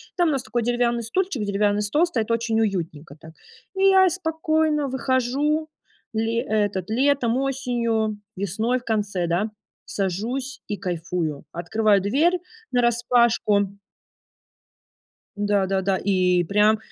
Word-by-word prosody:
там 350 -2 +2
у - - +1
нас 270 -4 -1
такой 235 +2 -2
деревянный 240 0 +1
стульчик, 270 - -1
деревянный 205 0 +1
стол 210 +12 +2
стоит- 235 -11 -2
очень 230 -1 +1
уютненько 165 -8 -3
так. 160 - -12 0.4
И 385 - 0
я 380 -1 +6
спокойно 315 -3 0
выхожу 265 +4 0 0.4
ли 225 +1 -1
этот, 205 -4 -1
летом, 255 -1 +2
осенью, 235 -5 -1 0.2
весной 215 +6 0
в - - -21
конце, 205 -6 -1
да, 175 +6 0 0.4
сажусь 230 +8 -3
и 205 - -3
кайфую. 170 -4 -3
Открываю 205 +4 +2
дверь 290 - +2 0.3
нараспашку. 235 -4 +2 1.6
Да-да-да, 195 -2 +1
и 185 -2 +2
прям, 210 +4 +3
225 Hz, 115 wpm, -23 LUFS, 200-260 Hz, 1.6 s, я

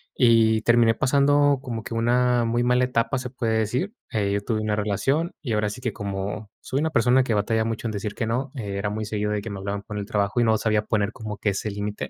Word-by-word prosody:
y 115 -2 +4
terminé 120 -1 +4
pasando 140 +2 +3
como 115 -5 -5
que - - -6
una 120 +1 +2
muy 120 +1 +1
mala 125 +1 +3
etapa, 125 +1 0
se 125 0 -5
puede 115 -4 0
decir, 125 - -1 0.2
eh, 100 -3 0
yo 100 - 0
tuve 110 +1 -1
una 105 -1 0
relación, 135 - 0
y 125 -7 -3
ahora 105 -1 +1
sí 125 +5 -8
que 120 -3 -2
como 100 +1 -4
soy 135 - -2
una 160 - +1
persona 125 -1 +4
que 120 - -1
batalla 110 +2 +1
mucho 115 +1 -3
en - - -2
decir 105 0 -4
que 115 - -2
no, 125 +4 -2
era 100 -4 -3
muy 110 +1 -3
seguido 105 0 -2
de 105 -1 -1
que 110 - -6
me 100 - -5
hablaban 100 +1 -4
por 105 +1 -7
el 100 - -4
trabajo, 105 0 0
y - - +3
no 110 -1 +3
sabía 110 -1 +1
poner 105 -1 0
como 105 -2 -6
que 105 - 0
ese 100 +2 -2
límite, 105 +1 -4
110 Hz, 250 wpm, -24 LUFS, 105-125 Hz, 0.2 s, y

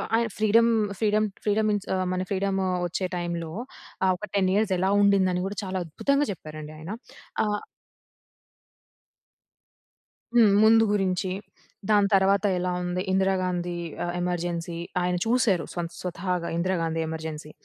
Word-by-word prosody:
ఆయన 230 0 +2
freedom 225 +2 +4 0.3
freedom 215 0 +2 0.2
freedom 215 +1 +2
ఇన్స్ 205 -1 -3
ఆహ్, 185 0 0
మన 185 - -1
ఫ్రీడమో 195 -1 0 0.2
వచ్చే 180 +2 -2
టైంలో, 170 -2 -3 0.5
ఆహ్, 185 - +4
ఒక 210 - -6
10 190 -2 +3
ఇయర్స్ 210 -2 +2
ఎలా 190 +2 +1
ఉండిందని 190 -3 +3
కూడా, 205 - -6
చాలా 185 -1 -2
అద్భుతంగా 280 - +1
చెప్పారండి 155 -3 -8
ఆయన. 165 +7 -6 0.5
ఆహ్ 210 0 -1 2.7
హ్మ్. 220 -4 +7
ముందు 225 +1 +6
గురించి, 185 -2 0 0.6
దాని 205 -1 +5
తర్వాత 195 +1 +4
ఎలా 180 0 -1
ఉంది? 180 +1 -2
'ఇందిరాగాంధీ' 185 -2 0 0.3
ఆహ్, 175 0 -2
ఎమర్జెన్సీ 175 -1 -2 0.2
ఆయన 180 0 +1
చూశారు 225 -7 +2 0.4
స్వతహాగా 180 -1 -2
'ఇందిరాగాంధీ' 165 -2 0
'ఎమర్జెన్సీ.' 160 -1 -6
185 Hz, 125 wpm, -26 LUFS, 175-205 Hz, 2.7 s, హ్మ్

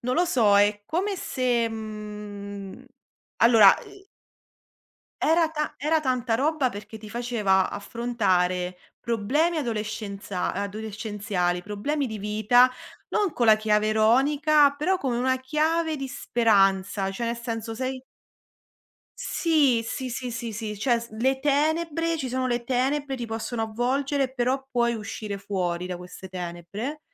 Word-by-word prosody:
non 250 +1 -1
lo 350 - +3
so, 225 - +4
è 205 0 +2
come 385 +4 -1
se 245 -7 0
mhmm, 210 -2 -7
mhmm 255 - -13 0.6
allora, 225 -4 +8
uhm 395 -1 -15 1.1
Era 325 +1 +3
ta 305 -1 -3
era 310 +3 +2
tanta 255 -5 0
roba, 290 +1 +1
perché 210 0 -9
ti 215 -1 -11
faceva 215 -5 +1
affrontare 185 -6 -1 0.2
problemi 255 +9 +1
adolescenza 210 - -3
adolescenziali, 205 -3 -2
problemi 235 +10 -2
di 220 -3 -5
vita, 215 +5 +4 0.4
non 410 -5 0
con 240 - +1
la 220 -1 +7
chiave 215 0 +1
ironica, 280 +7 +4
però 365 +6 +1
con 265 -8 -2
una 260 +2 +1
chiave 310 +4 0
di 275 -1 -4
speranza. 195 -6 +2
Cioè 230 +5 -3
ne 235 - -1
senso 230 -1 -5
sei 260 +2 -3 1.2
Sì, 290 -8 +2
sì, 255 +3 -4
sì, 245 +1 -4
sì, 230 0 -5
sì. 210 -1 -5
Cioè 235 +2 +2
s 235 - -9
le 260 +5 0
tenebre 315 +3 +1
ci 270 -5 -3
sono 255 +1 -1
le 240 -1 -1
tenebre, 270 +3 0
ti 240 -2 -5
possono 225 +1 -3
avvolgere, 260 +4 0
però 260 +1 0
puoi 235 -2 +1
uscire 210 -1 -5
fuori 180 -3 -2
da 180 - -3
queste 180 +1 -10
tenebre. 180 - -5
235 Hz, 140 wpm, -25 LUFS, 210-270 Hz, 1.2 s, allora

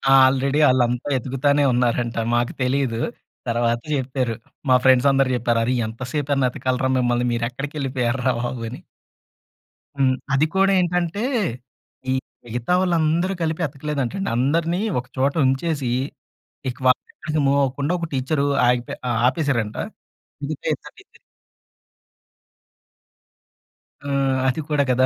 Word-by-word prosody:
Already 135 +2 +4
ఆళ్ళంతా 125 +1 +1
ఎతుకుతానే 135 +3 +1
ఉన్నారంట. 120 -1 0 0.2
మాకు 120 0 0
తెలీదు. 130 -3 0 0.5
తర్వాత 120 0 +1
జెప్పారు. 130 -3 -1 0.3
మా 130 - +7
ఫ్రెండ్స్ 130 0 +5
అందరూ 135 -1 +2
జెప్పారు. 120 -1 +1
"అరె! 125 +3 +1
ఎంత 115 +3 -10
సేప‌నేతకాలిరా 130 -3 0
మిమ్మల్ని? 120 -1 +1
మీరు 115 0 0
ఎక్కడికెళ్ళిపోయరా 130 -2 -1
బాబు!" 120 0 -3
అని. 125 - -8 1.2
హ్మ్. 135 -2 +3 0.2
అది 140 +3 +4
కూడా 195 +1 +4
ఏంటంటే, 180 +3 0 0.9
ఈ - - +3 0.3
మిగతా 120 +7 -2
వాళ్ళందరూ 170 +1 +1
కలిపి 160 +1 -1
ఎతకలేదంటండి. 145 +5 -3
అందరినీ 165 +7 +1 0.2
ఒక 125 - -8
చోట 135 +2 +2
ఉంచేసి, 135 -1 0 0.8
ఇక 125 - -6
వాళ్ళెక్కడికి 150 +4 0
మూవ్ 140 +1 +3
అవ్వకుండా 140 +4 -1
ఒక 165 - -3
టీచరు 140 +2 0 0.2
ఆగిపో 125 -1 +1 0.2
ఆ - - +1 0.2
ఆపేశారంట. 130 -7 -1 0.7
మిగతా 145 +1 -5
ఇద్దరు - - -13
టీచరులు - - -19 2.9
ఆహ్, 135 -1 +1
అది 135 +5 0
కూడా 150 -2 +2
కదా! 130 +1 +4
135 Hz, 115 wpm, -22 LUFS, 125-145 Hz, 2.9 s, మా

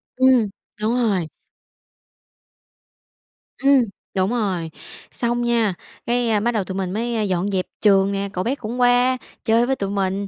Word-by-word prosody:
Ừm, 255 -4 +4 0.3
đúng 220 +2 +1
rồi. 205 -9 +1 2.3
Ừm, 275 -2 +4 0.3
đúng 190 +1 +1
rồi, 190 -9 -1 0.4
xong 240 0 -1
nha, 230 -5 +2 0.3
cái, 240 0 +1
a, 215 -2 +2
bắt 235 +3 +1
đầu 215 -4 0
tụi 190 +1 -6
mình 185 -1 -2
mới, 235 +2 -2
a, 220 - 0
dọn 190 0 0
dẹp 185 -1 0 0.2
trường 195 -1 +4
nè, 200 0 -2
cậu 185 - -2
bé 260 +4 0
cũng 245 0 -5
qua 245 +1 +4 0.3
chơi 230 +1 +3
với 265 +1 0
tụi 195 -4 -3
mình, 195 0 -1
220 Hz, 165 wpm, -21 LUFS, 195-240 Hz, 2.3 s, Ừm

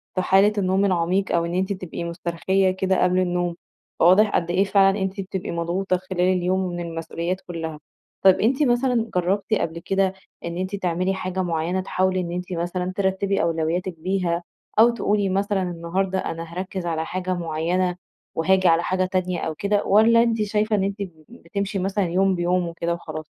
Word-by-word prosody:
في 185 - +1
حالة 195 +3 +4
النوم 190 0 +2
العميق، 185 +1 +1
أو 170 0 +1
إن 170 - -4
أنتِ 190 +2 0
تبقي 185 -3 -6
مسترخية 170 +3 0
كده 190 0 +1
قبل 180 0 +3
النوم، 175 -1 0 0.4
فواضح 185 +5 +6
قد 175 0 0
إيه 185 +2 +3
فعلًا 195 0 +3
أنتِ 190 +1 -2
بتبقي 190 -1 -5
مضغوطة 175 +3 -1
خلال 185 0 -4
اليوم 185 0 +2
من 175 0 -5
المسؤوليات 170 +2 -4
كلّها. 165 -4 -6 0.4
طب، 190 -1 +7
أنتِ 260 +7 +2
مثلًا 240 -3 +1
جربتِ 190 +4 0
قبل 170 -5 -1
كده 190 +2 0 0.3
إن 170 0 -4
أنتِ 185 +2 -2
تعملي 185 0 0
حاجة 185 0 -3
معيّنة 170 +2 -1
تحاولي 185 0 0
إن 170 -1 -3
أنتِ 180 +1 -4
مثلًا 180 +2 -2
ترتبي 195 0 0
أولوياتِك 165 +1 -1
بيها 180 -1 -1 0.4
أو 230 +2 +8
تقولي 210 -4 0
مثلًا 200 +1 0
النهارده 180 +2 -2
أنا 165 -2 -4
هاركز 185 0 -4
على 160 -1 -1
حاجة 185 0 -2
معيّنة، 175 +2 -1 0.4
وهاجي 185 +3 +3
على 165 0 +4
حاجة 185 0 0
تانية. 185 -1 -1
أو 160 -1 -3
كده، 200 +3 0
والّا 230 +3 +5
أنتِ 230 -2 0
شايفة 210 +1 +1
إن 195 - +1
أنتِ 195 +1 -2 0.3
بتمشي 200 -4 -4
مثلًا 195 +1 0
يوم 190 +2 +2
بيومه 175 0 0
كده 170 0 +1
وخلاص؟ 155 -2 -6
185 Hz, 175 wpm, -23 LUFS, 175-195 Hz, 0.4 s, أو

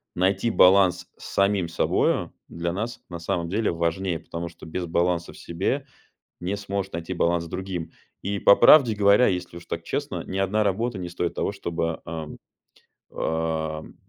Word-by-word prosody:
найти 95 +5 +1
баланс 90 -3 +5
с - - -12
самим 100 -2 +2
собою 85 - 0
для 85 0 -3
нас 115 +6 -4
на 85 - -6
самом 85 0 -2
деле 105 +4 0
важнее, 85 +1 -1
потому 85 0 -6
что 85 - -12
без 85 +2 -4
баланса 85 0 0
в - - -14
себе 100 +11 -2 0.6
не 95 +3 -2
сможешь 100 -1 -3
найти 85 +2 -4
баланс 85 -1 +1
с - - -8
другим. 90 -1 -5 0.3
И 100 0 -2
по 100 - +7
правде 125 -2 +7
говоря, 100 +3 +5
если 90 -2 -2
уж 85 - -12
так 85 - -5
честно, - - -3
ни 95 - -5
одна 95 +3 +1
работа 110 +3 0
не 90 -1 -5
стоит 90 -1 -2
того, - - -2
чтобы, 85 -4 -3
ам, 80 -2 -6 0.7
ам, 80 -1 -2
90 Hz, 170 wpm, -25 LUFS, 85-100 Hz, 0.7 s, по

